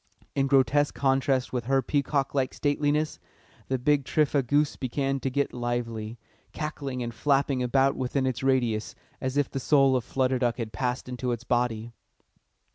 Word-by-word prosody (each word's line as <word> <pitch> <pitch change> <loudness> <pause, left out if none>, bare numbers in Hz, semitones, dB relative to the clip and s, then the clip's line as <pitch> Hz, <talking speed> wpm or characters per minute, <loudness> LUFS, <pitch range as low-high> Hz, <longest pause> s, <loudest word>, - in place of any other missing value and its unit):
In 135 -1 +1
grotesque 140 +2 +3
contrast 135 -1 +1
with 120 -3 -2
her 135 +1 +2
peacock 140 0 0
like 135 -2 0
stateliness, 150 +1 0 0.5
the 130 - 0
big 140 +3 +2
tripha 145 +1 +2
goose 145 +4 +1
began 135 +2 -1
to 135 - -2
get 140 +2 -1
lively, 120 -2 -3 0.4
cackling 140 -5 -4
and 120 0 -5
flapping 135 +2 +1
about 135 +2 +2
within 130 +1 -1
its 130 -2 -1
radius, 120 -3 0 0.3
as 130 +1 -2
if 145 -2 +1
the 135 - -2
soul 135 -1 +4
of 125 - 0
Flutter 130 0 0
Duck 120 -1 0
had 115 -2 -5
passed 125 0 -2
into 125 0 -3
its 120 -1 -3
body. 120 -2 -1
130 Hz, 165 wpm, -27 LUFS, 125-140 Hz, 0.5 s, soul